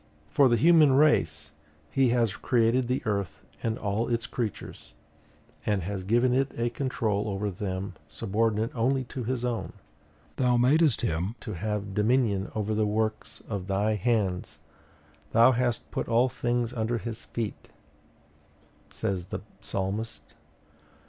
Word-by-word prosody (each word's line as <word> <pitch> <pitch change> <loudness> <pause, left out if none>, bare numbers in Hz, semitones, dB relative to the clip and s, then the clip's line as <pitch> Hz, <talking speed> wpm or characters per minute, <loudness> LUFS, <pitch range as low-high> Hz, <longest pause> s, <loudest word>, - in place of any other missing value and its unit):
For 140 -2 +5
the 120 - +3
human 155 +1 +6
race 80 - +3 0.4
he 135 -2 +3
has 115 -4 +2
created 120 +1 +2
the 125 +2 -1
earth 100 -7 -2 0.2
and 115 0 -1
all 100 +3 -1
its 115 -1 0
creatures, 110 - -5 0.7
and 100 -4 0
has 95 +1 -4
given 120 +5 +3
it 135 +1 +1
a 120 0 0
control 110 -6 -1
over 100 +1 -2
them 95 0 -4
subordinate 105 +9 0
only 130 +3 +1
to 125 0 -6
his 125 +1 -2
own. 120 -2 -3 0.6
'Thou 125 -2 +3
madest 145 +3 +4
him 95 0 -1
to 105 - -5
have 100 +2 -3
dominion 105 -2 +1
over 110 0 -1
the 105 0 +1
works 110 +1 -2
of 100 -4 -4
thy 100 +2 +1
hands; 105 -3 0 0.8
thou 115 +3 +7
hast 120 -2 -1
put - - -2
all 120 +3 +3
things 120 -1 -1
under 115 0 -1
his 115 -1 -5
feet,' 115 -3 -5 1.2
says 95 -2 -3
the - - -5 0.2
Psalmist. 100 +4 -4
110 Hz, 140 wpm, -28 LUFS, 100-120 Hz, 1.2 s, thou